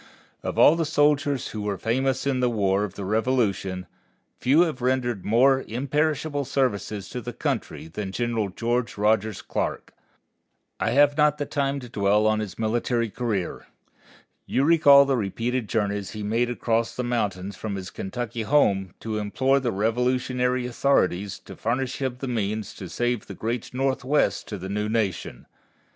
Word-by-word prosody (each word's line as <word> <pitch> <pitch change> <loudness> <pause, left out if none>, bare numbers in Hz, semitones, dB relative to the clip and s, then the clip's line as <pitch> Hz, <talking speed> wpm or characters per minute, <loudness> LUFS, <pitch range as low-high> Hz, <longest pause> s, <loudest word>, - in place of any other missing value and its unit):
Of - - -4
all 155 - +7
the 165 - 0
soldiers 145 -3 +1
who 110 - -5
were 105 -1 -2
famous 130 +6 0
in 135 -2 +1
the 125 -1 +2
War 100 -3 +1
of 105 - -5
the 100 - -5
Revolution, 105 -4 0 0.5
few 140 +6 +4
have 160 -7 0
rendered 125 -5 0
more 130 +5 +4
imperishable 145 +4 -1
services 120 -7 -1
to 125 - -5
the 120 +1 -6
country - - -3
than 95 +4 -5
General 115 -2 -1
George 120 +4 -2
Rogers 105 0 +1
Clark. - - -3 0.9
I - - +1
have 145 +4 +4
not 150 -1 +4
the 145 - -2
time 140 -1 -1
to 125 - -8
dwell 105 -1 +2
upon 110 0 +3
his 105 -4 -5
military 115 0 0
career. 105 -7 -3 0.8
You 135 - +1
recall 145 -3 +7
the 135 -1 +1
repeated 115 +2 -2
journeys 100 -2 -1
he 105 -1 -5
made 115 +4 +1
across 115 -1 -1
the 125 - -2
mountains 100 -5 -2
from 105 0 -4
his 95 -2 -6
Kentucky 120 +3 -4
home 100 -8 +2
to 110 -1 -3
implore 130 +6 +1
the 125 -3 -1
Revolutionary 125 +3 0
authorities 105 -7 +1
to - - -11
furnish 130 +1 -2
him 130 -2 -1
the 135 - -5
means 110 -3 -2
to 95 - -8
save 120 +5 -1
the 100 - -8
great 115 +4 -3
Northwest 135 +2 0
to 105 - -5
the 95 +1 -6
new 105 +2 -2
nation. 100 - -2
120 Hz, 165 wpm, -25 LUFS, 105-130 Hz, 0.9 s, all